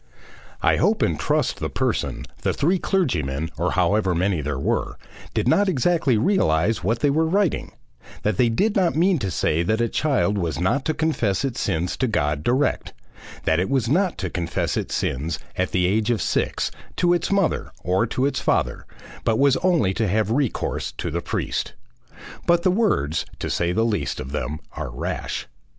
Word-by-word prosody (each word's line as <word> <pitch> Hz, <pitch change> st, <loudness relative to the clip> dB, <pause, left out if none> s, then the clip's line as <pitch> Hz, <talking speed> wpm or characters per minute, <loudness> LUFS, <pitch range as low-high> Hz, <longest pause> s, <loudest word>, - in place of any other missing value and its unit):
"I -, -, +4 dB
hope -, -, +2 dB
and -, -, 0 dB
trust -, -, 0 dB
the -, -, -2 dB
person, -, -, -1 dB, 0.2 s
the -, -, 0 dB
three 175 Hz, +6 st, +1 dB
clergymen, 80 Hz, -, 0 dB
or -, -, -1 dB
however 100 Hz, -4 st, +2 dB
many 90 Hz, -1 st, +1 dB
there 75 Hz, -1 st, -3 dB
were, 65 Hz, -, -1 dB, 0.4 s
did -, -, +1 dB
not 200 Hz, -1 st, +4 dB
exactly 150 Hz, -4 st, +2 dB
realise 105 Hz, -, +2 dB
what 115 Hz, +5 st, 0 dB
they 145 Hz, -, +3 dB
were 160 Hz, +3 st, +2 dB
writing; 195 Hz, +1 st, 0 dB, 0.5 s
that 105 Hz, -3 st, 0 dB
they 120 Hz, -, +4 dB
did 205 Hz, -, +1 dB
not 180 Hz, -4 st, +2 dB
mean 175 Hz, +1 st, +3 dB
to 100 Hz, -5 st, -2 dB
say 80 Hz, -2 st, +1 dB
that 110 Hz, +6 st, 0 dB
a 120 Hz, -, +2 dB
child 125 Hz, -8 st, +1 dB
was 80 Hz, -3 st, -2 dB
not 115 Hz, +10 st, +1 dB
to 155 Hz, -, 0 dB
confess 140 Hz, -, 0 dB
its 130 Hz, -3 st, -3 dB
sins 90 Hz, -2 st, -1 dB
to 130 Hz, -, +1 dB
God 75 Hz, -9 st, 0 dB
direct; 130 Hz, +4 st, 0 dB, 0.5 s
that 80 Hz, +1 st, +2 dB
it 90 Hz, -, 0 dB
was 130 Hz, -4 st, +1 dB
not 180 Hz, +7 st, +1 dB
to 95 Hz, -3 st, -3 dB
confess 85 Hz, -1 st, -2 dB
its -, -, -2 dB
sins, 75 Hz, +6 st, -1 dB, 0.2 s
at 95 Hz, -, 0 dB
the 90 Hz, -1 st, +1 dB
age 105 Hz, +4 st, +1 dB
of 120 Hz, -3 st, +1 dB
six, -, -, 0 dB, 0.2 s
to 175 Hz, -1 st, +3 dB
its 175 Hz, -1 st, 0 dB
mother, 195 Hz, -3 st, +1 dB
or 95 Hz, +6 st, +1 dB
to 130 Hz, +4 st, 0 dB
its 140 Hz, -, 0 dB
father, -, -, 0 dB, 0.4 s
but 110 Hz, -1 st, +2 dB
was 140 Hz, 0 st, +4 dB
only 170 Hz, -, +2 dB
to 110 Hz, +2 st, 0 dB
have 105 Hz, +2 st, +1 dB
recourse 130 Hz, -1 st, -1 dB
to -, -, -4 dB
the -, -, -2 dB
priest. -, -, -2 dB, 0.7 s
But 170 Hz, 0 st, +4 dB
the 185 Hz, -, +4 dB
words, 90 Hz, -, +1 dB
to -, -, -3 dB
say 85 Hz, 0 st, 0 dB
the 110 Hz, +5 st, +1 dB
least 100 Hz, -, -1 dB
of 65 Hz, -, -6 dB
them, 75 Hz, +1 st, -3 dB
are -, -, -5 dB
rash. -, -, -4 dB
110 Hz, 190 wpm, -23 LUFS, -, 0.7 s, I